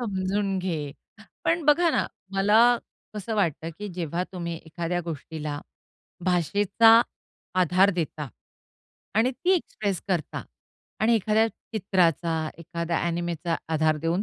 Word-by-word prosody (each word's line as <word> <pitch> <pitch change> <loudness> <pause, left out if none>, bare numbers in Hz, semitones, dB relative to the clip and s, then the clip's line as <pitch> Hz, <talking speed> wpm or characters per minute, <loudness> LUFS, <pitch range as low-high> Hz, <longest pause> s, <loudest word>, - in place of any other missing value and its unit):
समजून 195 -2 -1
घे. 160 -6 -3 0.5
पण 330 -2 +1
बघा 325 +3 +5
ना, - - +1 0.3
मला 205 +3 +5 0.5
कसं 210 +2 -4
वाटतं, 165 -5 0
की 210 0 -5
जेव्हा 170 0 -2
तुम्ही 170 -2 -4
एखाद्या 170 +2 -2
गोष्टीला 155 -2 -5 0.6
भाषेचा 205 +6 +5 0.6
आधार 185 +3 +4
देता 155 -4 -3 0.9
आणि 225 +4 +3
ती 355 +8 -1
एक्सप्रेस 205 - -2
करता 175 -6 -1 0.6
आणि 225 +3 +4
एखाद्या 220 +1 +3
चित्राचा, 170 -7 0
एखाद्या 170 0 -2
अ‍ॅनिमेचा 170 -1 -1 0.2
आधार 155 0 +3
देऊन 165 +5 0
180 Hz, 115 wpm, -26 LUFS, 165-210 Hz, 0.9 s, बघा